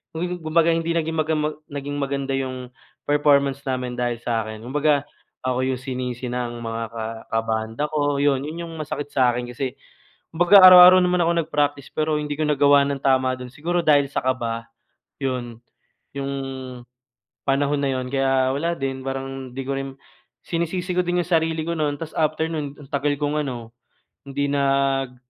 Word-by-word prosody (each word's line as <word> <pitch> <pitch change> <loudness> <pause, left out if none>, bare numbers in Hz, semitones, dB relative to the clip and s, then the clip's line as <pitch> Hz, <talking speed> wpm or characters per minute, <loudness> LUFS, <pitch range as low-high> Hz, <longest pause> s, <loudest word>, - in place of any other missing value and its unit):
kum 165 - -2 0.2
kumbaga 165 +1 +3
hindi 165 0 0
naging 160 0 -1
maga 155 0 +1
ma 150 0 0 0.2
naging 145 0 -4
maganda 140 -1 -2
yung 130 -2 -4 0.3
performance 140 -2 +3
namin 125 -1 -2
dahil 120 -1 -1
sa 115 -2 -1
akin 110 0 -8
kumbaga 145 +2 +1 0.4
ako 130 0 0
yung 130 -1 -2
sinisi 125 -1 -4
ng 120 -1 -4
mga 115 0 -3
ka 115 -1 -4 0.3
kabanda 110 +2 -1
ko 145 -2 0
yun, 140 -1 +2
yun 165 +2 -6
yung 165 - -9
masakit 145 -1 -4
sa 125 -3 +3
akin 120 0 -4
kasi 130 +1 -4 0.6
kumbaga 175 +4 +6
araw-araw 185 0 +10
naman 180 0 +2
ako 170 - +2
nag-practice 145 -3 -1
pero 155 -1 +1
hindi 150 -1 -4
ko 155 - +1
nagawa 145 -1 +4
ng 140 -1 -2
tama 130 -2 +2
do'n 125 - -7
siguro 170 +6 -1
dahil 145 -3 +4
sa - - 0
kaba. 115 -3 -2 0.6
'Yun, 120 -3 -3 0.6
'yong 140 0 -3 1.1
panahon 140 +1 +1
na 140 - +1
yun 130 - -4
kaya 135 0 +1
wala 170 +4 -1
din 135 -1 -3
parang 135 -1 -5
hindi 135 +2 -5
ko 140 - -2
rin 135 0 -3 0.6
sinisisi 175 +2 -2
ko 180 - +2
din 175 0 0
yung - - -14
sarili 160 -2 +1
ko 170 - -1
no'n 150 -3 -1
tapos 160 -1 -7
after 155 0 0
nun 150 -3 -5
ang 145 - -12
tagal 145 +1 +1
kong 150 +1 0
ano 120 -4 -6 0.5
hindi 140 +1 -2
nag 135 -2 +1
140 Hz, 175 wpm, -23 LUFS, 130-155 Hz, 1.1 s, araw-araw